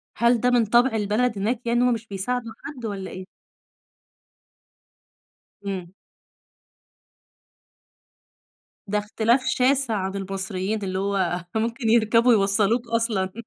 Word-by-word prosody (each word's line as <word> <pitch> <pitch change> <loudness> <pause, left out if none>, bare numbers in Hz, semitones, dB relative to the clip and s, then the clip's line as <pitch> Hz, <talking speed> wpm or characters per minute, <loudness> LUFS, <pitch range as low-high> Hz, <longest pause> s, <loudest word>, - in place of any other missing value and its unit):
هل 235 +1 +3
ده 250 - +3
من 240 -2 +3
طَبْع 240 +2 +3
البلد 215 +2 0
هناك 225 +4 -1
يعني 240 +1 +2
هُم 250 -1 +3
مش 225 0 -6
بيساعدوا 225 +4 -3
حد 265 -5 -7
والّا 195 -3 -5
إيه؟ 185 0 -8 2.4
إمم. 185 -3 -4 3.0
ده 210 +1 0
اختلاف 225 +5 +1
شاسع 260 -2 +2
عن 190 0 -3
المصريين، 195 +1 -3
اللي 190 0 -2
هو 185 -3 -1
ممكن 230 +1 -1
يركبوا 230 +1 +4
يوصلوك 210 +3 +2
أصلًا. 225 -5 0
220 Hz, 110 wpm, -24 LUFS, 195-235 Hz, 3.0 s, يركبوا